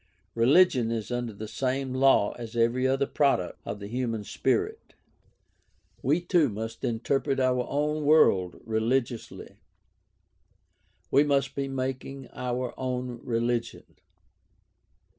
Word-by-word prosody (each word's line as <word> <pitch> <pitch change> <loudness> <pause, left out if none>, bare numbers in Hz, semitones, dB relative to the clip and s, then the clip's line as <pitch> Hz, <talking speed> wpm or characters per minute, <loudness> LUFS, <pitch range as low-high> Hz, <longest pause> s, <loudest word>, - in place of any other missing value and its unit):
Religion 125 0 +4
is 115 0 -3
under 120 -1 -2
the 110 +1 -8
same 130 +3 -2
law 130 -6 +4
as 115 -1 -8
every 120 +3 +2
other 135 +1 +1
product 140 -12 0
of 105 - -5
the 100 - -7
human 115 -1 -3
spirit. - - -2 1.1
We 150 +7 +2
too 175 -4 +2
must 115 +2 -6
interpret 130 +3 0
our 125 -1 +1
own 150 +2 -1
world 100 - +4
religiously; 115 +2 -2 1.5
we 140 - +5
must 140 -2 +1
be 140 0 -2
making 135 0 -4
our 125 0 -3
own 125 -2 -3
religion. 120 -1 -1
125 Hz, 115 wpm, -27 LUFS, 115-135 Hz, 1.5 s, we